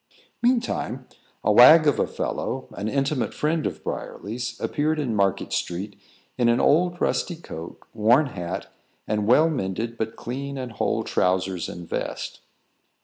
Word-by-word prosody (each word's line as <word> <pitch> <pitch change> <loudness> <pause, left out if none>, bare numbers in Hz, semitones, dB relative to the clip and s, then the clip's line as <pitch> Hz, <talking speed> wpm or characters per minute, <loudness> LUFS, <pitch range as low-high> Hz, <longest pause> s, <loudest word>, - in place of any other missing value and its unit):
Meantime, 235 - 0 0.4
a - - +3
wag 155 +9 +9
of 145 - +3
a - - +2
fellow, - - -3
an 105 - -4
intimate 135 +1 -1
friend 155 +1 0
of - - -7
Briarly's, 120 +5 -5
appeared 155 +2 0
in 125 -7 -1
Market 100 -2 0
street 95 +4 -3 0.4
in 120 -1 +4
an 120 - +3
old 175 +4 +3
rusty 175 - 0
coat, 85 - -9 0.2
worn 115 +7 +4
hat, 90 -10 -5 0.3
and 105 -1 0
well 150 +7 +6
mended 115 - -3
but 110 0 -2
clean 140 +3 -5
and 130 -2 -5
whole 110 - -1
trowsers 90 -1 0
and 85 -1 -8
vest. - - -4
120 Hz, 145 wpm, -24 LUFS, 105-150 Hz, 0.4 s, wag